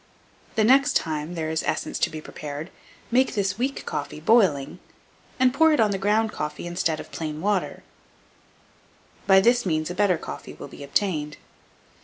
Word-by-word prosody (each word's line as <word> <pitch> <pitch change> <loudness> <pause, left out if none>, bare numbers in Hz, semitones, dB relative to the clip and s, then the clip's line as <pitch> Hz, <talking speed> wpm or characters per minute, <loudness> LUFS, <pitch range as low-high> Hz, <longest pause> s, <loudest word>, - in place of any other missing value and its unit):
The 220 - +3
next 275 +5 +4
time 155 +2 -1
there 160 -1 -2
is 160 - 0
essence 155 - -2
to - - +2
be 155 0 -7
prepared, 150 +2 -7 0.4
make 255 +2 +2
this 195 0 -1
weak 270 +3 -2
coffee 145 +1 -4
boiling, 160 - +2 0.6
and 255 -1 +4
pour 320 +3 +5
it 300 - +1
on 215 -2 +4
the 195 - -2
ground 210 +2 +2
coffee 150 -1 -5
instead 175 -2 -1
of - - -10
plain 155 -2 -5
water: 200 +1 -1 1.4
by 190 -1 +7
this 240 +5 +3
means 155 -2 -1
a - - -3
better 185 -2 +2
coffee - - -8
will - - -9
be - - -10
obtained. 150 0 -1
185 Hz, 170 wpm, -24 LUFS, 155-220 Hz, 1.4 s, by